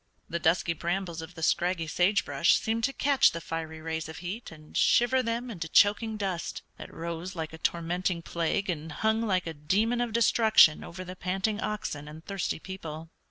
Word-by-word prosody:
The 170 - -3
dusky 170 +1 +2
brambles 170 0 -3
of 160 +2 -10
the 160 - -7
scraggy 175 0 +1
sage 180 +6 +2
brush 145 +4 +3
seemed 225 +1 -1
to 275 - 0
catch 275 -4 +3
the 165 - -3
fiery 160 -1 -5
rays 160 0 -4
of 160 - -8
heat 185 +6 -6
and 155 -1 -14
shiver 245 +2 +4
them 235 +1 -2
into 165 -6 -5
choking 215 +4 +4
dust, 190 -4 -3
that - - -9
rose 170 +2 -5
like 160 -1 -4
a 160 - -9
tormenting 170 +1 -1
plague 170 +5 -1
and 160 -3 -3
hung 220 +7 +1
like 190 -5 +1
a 165 - -4
demon 205 +11 +1
of 240 -2 -1
destruction 220 -7 +5
over 185 +2 -7
the 185 0 -8
panting 195 +4 -1
oxen 155 -8 -3
and 155 +2 -11
thirsty 195 -2 -2
people. 160 -3 -8
175 Hz, 190 wpm, -28 LUFS, 160-210 Hz, -, destruction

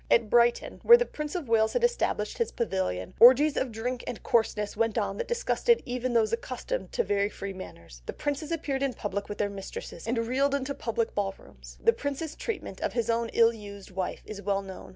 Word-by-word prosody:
At 230 -3 +3
Brighton, 240 0 +3
where 475 - +9
the 485 - 0
Prince 300 -5 -6
of 340 -7 -3
Wales 220 -1 +3
had 485 - 0
established 485 +1 0
his 465 - 0
pavilion, 190 - -2
orgies 265 +5 +8
of 260 - -1
drink 240 +3 -3
and 245 - -5
coarseness 210 -3 +1
went 225 0 0
on 200 -2 -1
that - - -3
disgusted 475 0 +2
even 250 0 -2
those 225 -2 +2
accustomed - - -3
to 475 - +1
very 200 - +1
free 200 -1 -6
manners; 85 - -11
the - - -2
princes 290 +2 -3
appeared 290 -5 -2
in 275 -2 0
public 200 -1 -4
with 205 - -5
their 205 - +1
mistresses, 195 -2 -8
and 235 +1 0
reeled 260 +5 +1
into 280 0 -2
public 230 -3 -2
ball 195 -1 -1
rooms. - - -15
The 460 - +4
Prince's 290 - -4
treatment 395 - -5
of - - -1
his 235 -1 0
own 230 0 0
ill 230 0 +5
used 200 -3 -10
wife 185 0 -4
is 205 -2 -7
well 200 0 0
known. 190 -1 -9
230 Hz, 215 wpm, -28 LUFS, 205-280 Hz, -, where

